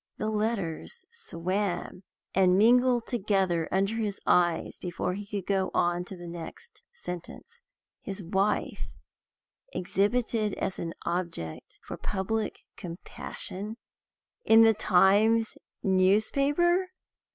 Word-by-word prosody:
The 215 Hz, 0 st, -2 dB
letters 215 Hz, -, -2 dB
swam 190 Hz, -, -3 dB, 0.3 s
and 185 Hz, -1 st, +4 dB
mingled 245 Hz, +2 st, +4 dB
together 190 Hz, -7 st, 0 dB
under 195 Hz, +4 st, +1 dB
his 210 Hz, -3 st, -2 dB
eyes 175 Hz, -2 st, +2 dB
before 180 Hz, 0 st, -3 dB
he 200 Hz, +1 st, -6 dB
could 200 Hz, -3 st, -4 dB
go 195 Hz, -1 st, +1 dB
on 175 Hz, 0 st, +1 dB
to 190 Hz, -, -9 dB
the 175 Hz, 0 st, -9 dB
next 175 Hz, -, -9 dB
sentence. 465 Hz, -, -9 dB, 0.4 s
His 195 Hz, 0 st, -5 dB
wife 195 Hz, +5 st, -1 dB, 0.8 s
exhibited 210 Hz, +3 st, 0 dB
as 190 Hz, -, -3 dB
an 165 Hz, -1 st, -4 dB
object 170 Hz, -, -4 dB
for -, -, -7 dB
public 215 Hz, +3 st, -2 dB, 0.2 s
compassion 190 Hz, +3 st, -6 dB, 0.7 s
in 225 Hz, 0 st, +7 dB
the 225 Hz, 0 st, +6 dB
Times 210 Hz, +3 st, +4 dB, 0.3 s
newspaper! 275 Hz, -, +3 dB
200 Hz, 105 wpm, -28 LUFS, 180-225 Hz, 0.8 s, in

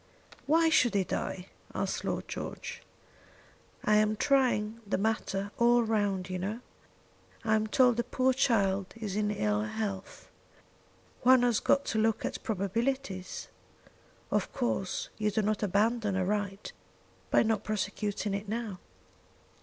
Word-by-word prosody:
"Why 325 Hz, +2 st, +4 dB
should 255 Hz, -9 st, +4 dB
he 195 Hz, -, +3 dB
die?" 180 Hz, 0 st, -3 dB, 0.3 s
asked -, -, -2 dB
Lord -, -, -2 dB
George. -, -, -6 dB, 1.0 s
"I 210 Hz, 0 st, +5 dB
am 215 Hz, 0 st, +3 dB
trying 230 Hz, -4 st, +1 dB
the -, -, 0 dB
matter 200 Hz, -1 st, -1 dB
all 240 Hz, 0 st, +5 dB
round, 205 Hz, -4 st, 0 dB
you 185 Hz, -1 st, -3 dB
know. 210 Hz, +6 st, -3 dB, 0.8 s
I 220 Hz, -, +3 dB
am 215 Hz, 0 st, +2 dB
told 245 Hz, +1 st, +4 dB
the 240 Hz, -, +1 dB
poor 255 Hz, +2 st, +1 dB
child 200 Hz, -7 st, +1 dB
is 210 Hz, -4 st, -4 dB
in 210 Hz, 0 st, +1 dB
ill 105 Hz, -, 0 dB
health. 195 Hz, -, -4 dB, 0.9 s
One 255 Hz, 0 st, +6 dB
has 240 Hz, -3 st, +3 dB
got 280 Hz, 0 st, +2 dB
to 220 Hz, -, -1 dB
look 220 Hz, 0 st, +1 dB
at -, -, -4 dB
probabilities. 200 Hz, -1 st, -2 dB, 0.8 s
Of -, -, 0 dB
course 240 Hz, -7 st, -2 dB
you 210 Hz, -1 st, +2 dB
do 210 Hz, +1 st, 0 dB
not 215 Hz, 0 st, 0 dB
abandon 210 Hz, +1 st, +1 dB
a 185 Hz, -1 st, +1 dB
right 205 Hz, 0 st, -2 dB, 0.6 s
by -, -, +5 dB
not 220 Hz, -2 st, 0 dB
prosecuting 205 Hz, 0 st, -2 dB
it 200 Hz, +1 st, -4 dB
now." 220 Hz, -4 st, -3 dB
215 Hz, 140 wpm, -30 LUFS, 200-235 Hz, 1.0 s, One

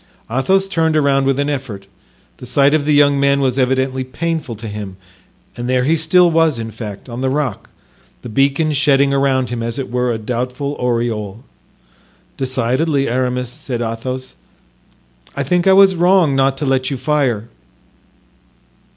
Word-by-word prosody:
Athos 190 Hz, +10 st, +1 dB
turned 160 Hz, -4 st, +1 dB
around 135 Hz, -2 st, +2 dB
with 135 Hz, 0 st, +1 dB
an 145 Hz, -, 0 dB
effort; 130 Hz, -9 st, -5 dB, 0.5 s
the 125 Hz, -, -9 dB
sight 140 Hz, +3 st, +3 dB
of 155 Hz, -2 st, +1 dB
the 150 Hz, -, +2 dB
young 145 Hz, -1 st, +4 dB
man 140 Hz, 0 st, +2 dB
was 135 Hz, -1 st, 0 dB
evidently 130 Hz, 0 st, 0 dB
painful 155 Hz, -1 st, -4 dB
to 110 Hz, +2 st, -8 dB
him, 105 Hz, -3 st, -7 dB, 0.6 s
and 120 Hz, +1 st, -5 dB
there 130 Hz, 0 st, +2 dB
he 155 Hz, +5 st, +2 dB
still 170 Hz, +2 st, +3 dB
was, 160 Hz, -4 st, +2 dB
in 115 Hz, -1 st, -5 dB
fact, 105 Hz, -1 st, -8 dB
on 120 Hz, 0 st, -6 dB
the 130 Hz, -, 0 dB
rock, 135 Hz, -5 st, -3 dB, 0.5 s
the -, -, -7 dB
beacon 140 Hz, +6 st, +1 dB
shedding 140 Hz, -1 st, +3 dB
around 135 Hz, -3 st, +1 dB
him, 120 Hz, -1 st, -3 dB
as 115 Hz, +2 st, -4 dB
it 135 Hz, -3 st, -5 dB
were, 125 Hz, 0 st, 0 dB
a 115 Hz, -, -2 dB
doubtful 125 Hz, +5 st, -3 dB
aureole. 115 Hz, -3 st, -2 dB, 0.9 s
"Decidedly, 130 Hz, +3 st, 0 dB
Aramis," 125 Hz, 0 st, -1 dB
said 130 Hz, -2 st, -6 dB
Athos, 125 Hz, +3 st, -5 dB, 1.0 s
"I 140 Hz, -, -1 dB
think 175 Hz, +6 st, +1 dB
I 190 Hz, -, +6 dB
was 195 Hz, 0 st, +6 dB
wrong 175 Hz, -4 st, +3 dB
not 135 Hz, 0 st, +2 dB
to 150 Hz, -, -2 dB
let 130 Hz, -1 st, 0 dB
you 135 Hz, -, -3 dB
fire." 125 Hz, -6 st, -1 dB
135 Hz, 165 wpm, -17 LUFS, 125-145 Hz, 1.0 s, I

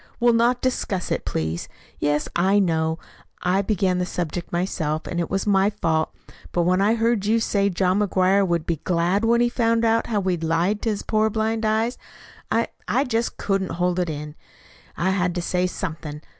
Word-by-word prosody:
"We'll 240 Hz, 0 st, +4 dB
not 240 Hz, +2 st, +2 dB
discuss 205 Hz, -7 st, -1 dB
it, -, -, -1 dB
please, 80 Hz, +1 st, -3 dB, 0.3 s
Yes, 145 Hz, 0 st, 0 dB
I 190 Hz, +4 st, +3 dB
know, 160 Hz, -4 st, +1 dB, 0.5 s
I 185 Hz, +2 st, +2 dB
began 190 Hz, -3 st, 0 dB
the 180 Hz, -, 0 dB
subject 175 Hz, 0 st, -4 dB
myself, 160 Hz, -3 st, -1 dB
and 175 Hz, -, -3 dB
it 170 Hz, -, -1 dB
was 195 Hz, 0 st, -1 dB
my 195 Hz, -1 st, +3 dB
fault; 160 Hz, -6 st, 0 dB, 0.4 s
but 175 Hz, -, +1 dB
when 185 Hz, +2 st, +2 dB
I 210 Hz, +3 st, +3 dB
heard 225 Hz, -3 st, +1 dB
you 225 Hz, +2 st, +3 dB
say 200 Hz, -3 st, +1 dB
John 185 Hz, +1 st, +1 dB
McGuire 195 Hz, -1 st, +3 dB
would 170 Hz, -2 st, 0 dB
be 170 Hz, -, -1 dB
glad 175 Hz, +6 st, 0 dB
when 235 Hz, +1 st, +3 dB
he 240 Hz, -, +4 dB
found 230 Hz, -1 st, +1 dB
out 225 Hz, 0 st, +2 dB
how 215 Hz, -3 st, 0 dB
we'd 180 Hz, -4 st, -1 dB
lied 170 Hz, +6 st, +1 dB
to 230 Hz, -, 0 dB
his 210 Hz, -2 st, -2 dB
poor 215 Hz, 0 st, +2 dB
blind 220 Hz, +1 st, -1 dB
eyes, 220 Hz, +3 st, 0 dB, 0.5 s
I -, -, +1 dB, 0.2 s
I 265 Hz, -, +2 dB
just 230 Hz, -3 st, -1 dB
couldn't 195 Hz, -2 st, -1 dB
hold 180 Hz, +1 st, 0 dB
it 175 Hz, -2 st, 0 dB
in. 150 Hz, -1 st, -5 dB, 0.6 s
I 185 Hz, +3 st, +1 dB
had 180 Hz, -2 st, 0 dB
to 175 Hz, -, -1 dB
say 180 Hz, +1 st, +1 dB
something. 155 Hz, -5 st, -5 dB
190 Hz, 195 wpm, -23 LUFS, 170-220 Hz, 0.6 s, We'll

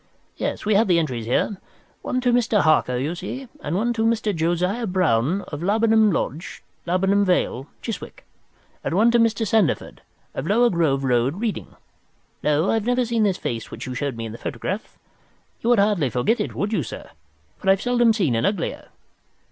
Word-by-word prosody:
Yes, -, -, -3 dB
we 215 Hz, -, +2 dB
have 205 Hz, +2 st, +4 dB
the 175 Hz, -2 st, +4 dB
entries 125 Hz, -9 st, -2 dB
here. 190 Hz, -, 0 dB, 0.4 s
One 255 Hz, -, -2 dB
to 245 Hz, -1 st, +2 dB
Mr. 230 Hz, -3 st, +3 dB
Harker 155 Hz, -5 st, +3 dB
you 140 Hz, +6 st, -2 dB
see, 255 Hz, +9 st, -6 dB
and 150 Hz, +3 st, -3 dB
one 235 Hz, +5 st, +1 dB
to 225 Hz, -1 st, -1 dB
Mr. 225 Hz, -3 st, +1 dB
Josiah 180 Hz, +8 st, 0 dB
Brown, 180 Hz, -, +1 dB
of 145 Hz, 0 st, -6 dB
Laburnum 220 Hz, +2 st, +3 dB
Lodge, 165 Hz, -1 st, -4 dB, 0.2 s
Laburnum 195 Hz, +3 st, +2 dB
Vale, 175 Hz, -8 st, 0 dB, 0.2 s
Chiswick, 225 Hz, -, -7 dB, 0.6 s
and -, -, -2 dB
one 225 Hz, +5 st, +5 dB
to 240 Hz, -, +3 dB
Mr. 230 Hz, 0 st, +2 dB
Sandeford, 210 Hz, -4 st, 0 dB, 0.3 s
of 140 Hz, -, -4 dB
Lower 235 Hz, +4 st, +4 dB
Grove 155 Hz, -6 st, +1 dB
Road, 125 Hz, +2 st, +1 dB
Reading. 225 Hz, -2 st, -4 dB, 0.7 s
No, 150 Hz, +4 st, +2 dB
I -, -, +1 dB
have 220 Hz, -2 st, 0 dB
never 245 Hz, 0 st, +2 dB
seen 230 Hz, -1 st, 0 dB
this 200 Hz, -3 st, +2 dB
face 115 Hz, -2 st, -4 dB
which -, -, -7 dB
you 130 Hz, -, -5 dB
show 140 Hz, +2 st, -2 dB
me 115 Hz, -2 st, -6 dB
in 110 Hz, -, -6 dB
the 115 Hz, -, -9 dB
photograph. 190 Hz, -, -5 dB, 0.6 s
You 235 Hz, -, 0 dB
would 240 Hz, -, +5 dB
hardly 200 Hz, -9 st, +2 dB
forget 125 Hz, -, +1 dB
it, 210 Hz, -, -3 dB
would 205 Hz, +2 st, -2 dB
you, 190 Hz, -, +1 dB
sir, 125 Hz, -, -8 dB, 0.5 s
for 190 Hz, -, -1 dB
I've 195 Hz, 0 st, +5 dB
seldom 240 Hz, -1 st, +3 dB
seen 180 Hz, -, +1 dB
an 115 Hz, -, 0 dB
uglier. 185 Hz, +3 st, -2 dB
195 Hz, 190 wpm, -23 LUFS, 150-225 Hz, 0.7 s, one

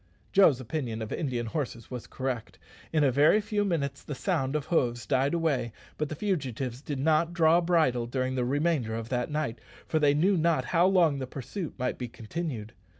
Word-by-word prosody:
Joe's 165 Hz, -10 st, +6 dB
opinion 120 Hz, -3 st, -3 dB
of 110 Hz, -, -7 dB
Indian 125 Hz, -7 st, -2 dB
horses 120 Hz, -2 st, -4 dB
was 125 Hz, -2 st, -6 dB
correct. 120 Hz, -9 st, -4 dB, 0.3 s
In 155 Hz, -2 st, +3 dB
a 135 Hz, -, +4 dB
very 145 Hz, -, +5 dB
few 210 Hz, -1 st, -1 dB
minutes 140 Hz, -8 st, -1 dB
the 145 Hz, -, -6 dB
sound 150 Hz, -5 st, -1 dB
of 150 Hz, -2 st, -1 dB
hoofs 120 Hz, -7 st, 0 dB
died 135 Hz, +3 st, +1 dB
away; 140 Hz, -9 st, 0 dB, 0.3 s
but 150 Hz, -1 st, -1 dB
the 155 Hz, -, -4 dB
fugitives 135 Hz, -, -2 dB
did 145 Hz, -1 st, -4 dB
not 160 Hz, +4 st, +2 dB
draw 165 Hz, 0 st, +5 dB
bridle 155 Hz, -9 st, +2 dB
during 130 Hz, +1 st, -1 dB
the 125 Hz, -1 st, 0 dB
remainder 140 Hz, -3 st, 0 dB
of 115 Hz, 0 st, -5 dB
that 125 Hz, -1 st, -1 dB
night, 150 Hz, -7 st, -2 dB, 0.3 s
for 155 Hz, -, 0 dB
they 145 Hz, -1 st, +4 dB
knew 185 Hz, +6 st, +3 dB
not 160 Hz, -5 st, +2 dB
how 170 Hz, +5 st, +3 dB
long 170 Hz, -7 st, +3 dB
the 130 Hz, -, -4 dB
pursuit 140 Hz, -, -6 dB
might 125 Hz, -1 st, -2 dB
be 125 Hz, -, -3 dB
continued. 115 Hz, -1 st, -5 dB
140 Hz, 195 wpm, -28 LUFS, 125-165 Hz, 0.3 s, Joe's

